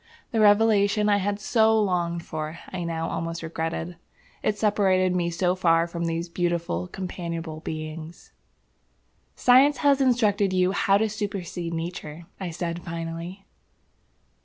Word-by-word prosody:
The 225 - 0
revelation 210 0 +4
I 205 - +4
had 200 +1 -1
so 220 0 +3
longed 175 -4 0
for, 155 +1 -5
I 185 -2 -4
now 165 -1 -2
almost 165 0 -4
regretted. 165 +1 -4 0.4
It 210 - 0
separated 190 -3 +2
me 175 -1 0
so 175 +1 +1
far 165 -2 +3
from 170 0 -4
these 165 +1 -2
beautiful, 170 - -1
companionable 170 - -5
beings. 155 +1 -7 1.0
"Science 265 +4 +5
has 280 -1 +5
instructed 210 -6 +2
you 185 0 +3
how 195 0 +3
to 220 +2 +1
supercede 195 -5 -4
Nature," 165 -1 -6
I 190 -2 -4
said, 170 0 -4
finally. 170 +3 -6
175 Hz, 135 wpm, -25 LUFS, 165-205 Hz, 1.0 s, Science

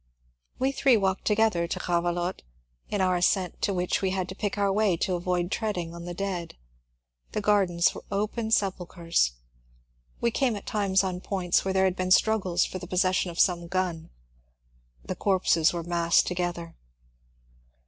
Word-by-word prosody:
We 265 +1 +1
three 270 -3 +3
walked 190 -2 -1
together 210 -5 +2
to - - -3
Grrave 175 0 0
lotte, 175 +1 -3 0.5
in 205 - -1
our 185 -1 +2
ascent 180 0 0
to - - +1
which 180 -1 -1
we 190 - +1
had 185 -1 -2
to 190 - -7
pick 205 0 -3
our 200 -1 +1
way 205 -4 +2
to 185 - -1
avoid 175 0 -1
treading 180 -7 -2
on 170 0 -8
the 175 0 -6
dead. 185 -3 -4 0.8
The 215 - -1
gardens 195 -5 +2
were - - -9
open 215 +3 -2
sepulchres. 175 - 0 0.9
We 235 - +1
came 245 -1 +1
at 200 - -8
times 195 -2 +1
on 185 -1 -3
points 185 -3 0
where 190 0 -2
there 190 0 +4
had 185 -1 +1
been 185 -1 -2
struggles 185 -3 +3
for 185 - -6
the 175 - -8
possession 185 0 +1
of 170 - -7
some 175 -2 +2
g^,.the 180 -3 -2 1.1
corpses 180 -4 +2
were 170 -1 -4
massed 170 0 +2
to - - -2
gether. 175 -2 -4
185 Hz, 170 wpm, -27 LUFS, 175-200 Hz, 1.1 s, there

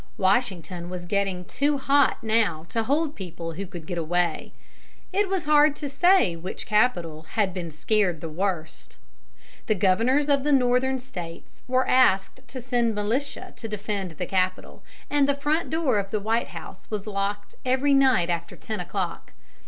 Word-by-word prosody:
Washington 185 -4 0
was 180 -1 -6
getting 190 -1 -1
too 285 +7 0
hot 275 -1 +2
now 215 -8 +1
to 225 - 0
hold 295 +6 0
people 170 -3 -6
who 190 +4 -6
could 175 -3 -9
get 175 -1 -3
away. 175 +2 -1 0.6
It 400 0 +1
was 380 -4 -1
hard 295 0 +5
to 295 - -5
say 290 - +4
which 175 +3 -6
capital 175 -8 +1
had 205 -5 +1
been 175 -3 -4
scared 180 +2 0
the 165 - -5
worst. 160 -1 -4 0.7
The 215 - +2
Governors 225 +10 +2
of 280 -2 +3
the 295 - +1
Northern 260 0 +3
States 180 -10 -9
were 255 +1 +2
asked 255 +1 +3
to 260 - -7
send 240 -3 0
militia 235 +8 -2
to 225 - -6
defend 205 -5 -4
the 180 - -2
capital, 185 0 -1 0.3
and 285 -1 +2
the 280 - +3
front 300 +4 0
door 305 -9 +1
of 195 -1 -4
the 215 - -1
White 225 +3 0
House 175 +2 -10
was 210 -2 -3
locked 205 0 -3
every 260 +3 +2
night 260 -11 +4
after 170 0 -3
ten 215 -2 -5
o'clock. 180 0 -4
210 Hz, 170 wpm, -25 LUFS, 180-265 Hz, 0.7 s, hard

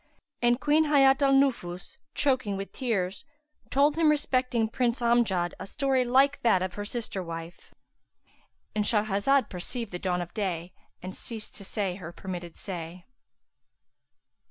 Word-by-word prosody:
And 240 +1 +3
Queen 300 +3 +3
Hayat 275 -2 +5
al 275 -1 +4
Nufus, 245 -10 0 0.2
choking 255 -8 +1
with 195 0 -6
tears, 200 -7 -2 0.5
told 285 +3 +3
him 325 -2 +4
respecting 255 -6 +1
Prince 235 +1 0
Amjad 230 -8 +2
a - - -7
story 265 +2 +1
like 270 +3 +3
that 190 -6 +3
of 185 -1 -3
her 205 +2 -5
sister 220 -3 -4
wife.—And 170 +4 -9
Shahrazad 215 +4 +2
perceived 205 +5 -4
the 180 - -5
dawn 180 -1 -1
of 175 - -13
day 180 -4 -3 0.3
and 185 +1 -6
ceased 225 -3 -6
to 200 - -6
say 195 -2 -2
her 170 -3 -8
permitted 175 -2 -7
say. 175 -2 -6
215 Hz, 140 wpm, -28 LUFS, 185-260 Hz, 0.5 s, Hayat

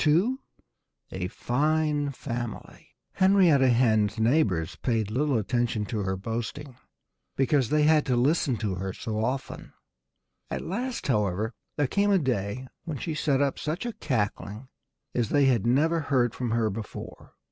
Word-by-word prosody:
II 180 +12 +3 0.7
A 90 -1 -3
FINE 150 +6 0
FAMILY 120 -3 -6 0.2
Henrietta 180 -9 +4
Hen's 110 -3 +3
neighbors 110 - +1
paid 110 -4 -1
little 140 +2 +1
attention 115 0 0
to 110 +1 -3
her 95 -1 -1
boasting, 120 +6 -5 0.6
because 135 -2 +2
they 150 0 +3
had 155 0 +5
to 125 - +2
listen 130 0 +2
to 105 -4 -2
it 95 - -4
so 110 -1 -3
often. 130 +3 -4 0.8
At - - -3
last, 240 +7 -3
however, 105 -2 0 0.2
there 145 - +2
came 200 +10 +1
a 200 - +5
day 125 - -2 0.2
when 155 -4 -4
she 160 +4 -3
set 145 -3 +1
up 140 - -1
such 160 +8 -3
a 240 - -3
cackling 110 - -3 0.4
as 120 -3 0
they 145 -1 +4
had 120 -5 +2
never 155 +7 +3
heard 130 -6 +1
from 125 -2 -3
her 110 -1 +1
before. 110 +2 -8
125 Hz, 150 wpm, -27 LUFS, 110-150 Hz, 0.8 s, had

